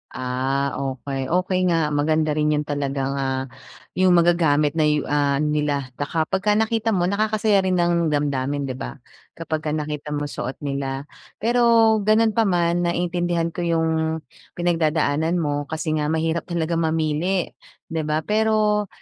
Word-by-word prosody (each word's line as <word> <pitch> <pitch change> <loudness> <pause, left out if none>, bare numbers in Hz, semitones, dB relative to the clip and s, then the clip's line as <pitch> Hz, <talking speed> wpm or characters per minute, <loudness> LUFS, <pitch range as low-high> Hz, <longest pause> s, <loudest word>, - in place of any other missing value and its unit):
Ah, 130 +2 -1
okey, 135 0 -4
okey 185 +2 +1
nga. 165 -3 +1
Maganda 155 +1 +1
rin 150 0 +1
yun 150 - 0
talagang 140 -2 -2
ah, 130 -1 -1 0.5
yung 185 -1 +3
magagamit 160 -4 +3
na 155 -2 +1
yu 150 -1 +1
ah, 145 -1 +1
nila 150 -3 -1
baka 160 +3 0
kapag 195 +5 0
nakita 220 0 +1
mo 175 - +1
nakakasaya 215 0 +2
rin 185 -1 +1
ng 170 -1 +2
damdamin, 145 -1 -1
'di 135 - -3
ba? - - -6 0.4
Kapag 155 -2 -3
nakita 150 0 -4
mo 145 - -2
suot 135 -2 -4
nila. 140 -1 -3 0.4
Pero, 230 -2 +4
gano'n 215 +2 +3
pa 225 -1 +2
man, 175 -1 +1
naintindihan 175 -1 -1
ko - - -7
yung 165 -1 +1 0.7
pinagdadaanan 160 -2 +1
mo, 145 -3 -1
kasi 160 0 -3
nga 150 - -1
mahirap 160 +1 -1
talaga 170 -1 -1
mamili 160 +3 0 0.4
'di 160 -1 -1
ba, 155 +1 0
pero 210 0 +1
160 Hz, 150 wpm, -22 LUFS, 145-180 Hz, 0.7 s, Pero